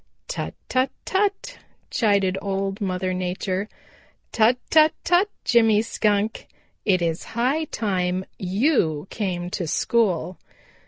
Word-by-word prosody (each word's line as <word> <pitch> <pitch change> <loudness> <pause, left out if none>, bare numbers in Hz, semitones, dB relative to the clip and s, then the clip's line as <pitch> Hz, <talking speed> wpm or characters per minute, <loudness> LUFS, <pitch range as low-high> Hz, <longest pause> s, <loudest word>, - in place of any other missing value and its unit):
"Tut, - - -4
tut, 260 +1 +1 0.2
tut!" 405 +5 -1 0.3
chided 200 -4 +2
Old 195 0 -2
Mother 185 -1 -1
Nature. 185 +2 -2 0.6
"Tut, 235 +2 +4
tut, 310 0 +6
tut, 360 +4 +3 0.2
Jimmy 225 -3 +4
Skunk! 210 -1 0 0.4
It 185 -4 +3
is 165 -1 -1
high 275 +7 +1
time 185 -7 -1
you 185 - +1
came 180 -4 -3
to 175 -3 -3
school. 185 -2 0
200 Hz, 110 wpm, -23 LUFS, 185-235 Hz, 0.6 s, tut